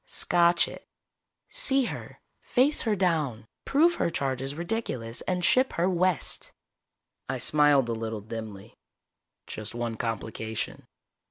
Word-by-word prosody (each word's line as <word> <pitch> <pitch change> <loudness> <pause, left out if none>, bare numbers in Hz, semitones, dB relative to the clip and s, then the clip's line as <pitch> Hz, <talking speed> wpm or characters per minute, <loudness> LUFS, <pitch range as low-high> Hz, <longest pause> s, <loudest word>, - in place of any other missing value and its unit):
"Scotch 170 0 +3
it. - - -11 0.6
See 275 - +2
her, - - -6 0.2
face 270 +4 +2
her 220 -3 +1
down, 155 - 0 0.2
prove 330 +5 +3
her - - +2
charge 135 -5 -2
is 135 +1 -4
ridiculous, 165 - -3
and 180 -1 0
ship 255 +6 +3
her 170 +2 +1
west." 185 -3 0 0.8
I - - -1
smiled 145 -4 +5
a 115 - -1
little 110 -1 -4
dimly. 110 -2 -8 0.7
"Just 110 +1 -6
one 120 -1 -3
complication." 110 -1 -4
150 Hz, 125 wpm, -27 LUFS, 115-185 Hz, 0.8 s, smiled